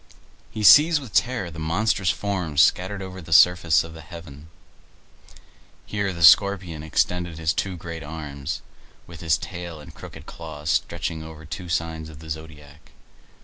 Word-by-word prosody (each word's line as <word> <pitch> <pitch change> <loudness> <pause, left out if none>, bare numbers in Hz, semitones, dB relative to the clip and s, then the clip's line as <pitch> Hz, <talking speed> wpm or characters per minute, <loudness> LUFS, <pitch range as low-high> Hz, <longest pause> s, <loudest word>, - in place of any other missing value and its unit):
He 110 - -5
sees 150 +7 +8
with 130 -8 -11
terror 120 -9 0
the 80 - -9
monstrous 95 +4 0
forms 90 -3 -2
scattered 95 +2 0
over 95 0 -8
the 80 -1 -12
surface 85 0 +5
of 80 0 -10
heaven. 80 -2 -11 1.4
Here 100 -2 -2
the 85 -2 -4
Scorpion 90 -3 +5
extended 85 +2 -1
his 80 -1 0
two 95 -2 -3
great 85 -2 -7
arms, 75 -1 -6 0.4
with 85 -1 -12
his 80 -3 +1
tail 85 -3 -7
and 75 - -12
crooked - - -11
claws 75 -2 -6
stretching 80 0 -2
over 80 0 -10
two 85 +3 -7
signs 80 -1 -3
of 80 - -12
the 80 0 -10
zodiac. 75 -1 -10
80 Hz, 150 wpm, -24 LUFS, 80-95 Hz, 1.4 s, sees